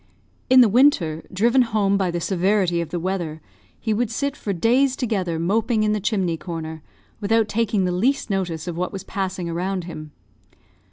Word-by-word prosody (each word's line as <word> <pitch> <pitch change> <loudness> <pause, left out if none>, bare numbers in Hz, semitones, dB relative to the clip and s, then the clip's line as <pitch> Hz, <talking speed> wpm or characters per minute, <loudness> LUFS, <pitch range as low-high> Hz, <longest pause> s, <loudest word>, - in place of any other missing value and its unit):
In 255 0 +8
the 240 - +7
winter, 195 - +3
driven 235 +7 +3
home 210 -4 +1
by 190 -2 +1
the 175 0 -2
severity 185 -1 +1
of 170 - -5
the 175 +2 -3
weather, 170 -3 -3 0.4
he 220 - -1
would 230 +1 0
sit 280 +5 -2
for 210 - -4
days 250 +8 +2
together 195 -10 -1
moping 215 +6 +1
in 210 - +2
the 210 - 0
chimney 190 -5 0
corner, 160 -2 -6 0.4
without 220 +1 +2
taking 210 -3 0
the 180 - 0
least 245 +10 +1
notice 180 -5 -2
of 175 - -3
what 180 +1 -2
was 195 -2 -6
passing 190 -3 -3
around 180 +2 -2
him. 155 -3 -8
195 Hz, 180 wpm, -22 LUFS, 175-225 Hz, 0.4 s, In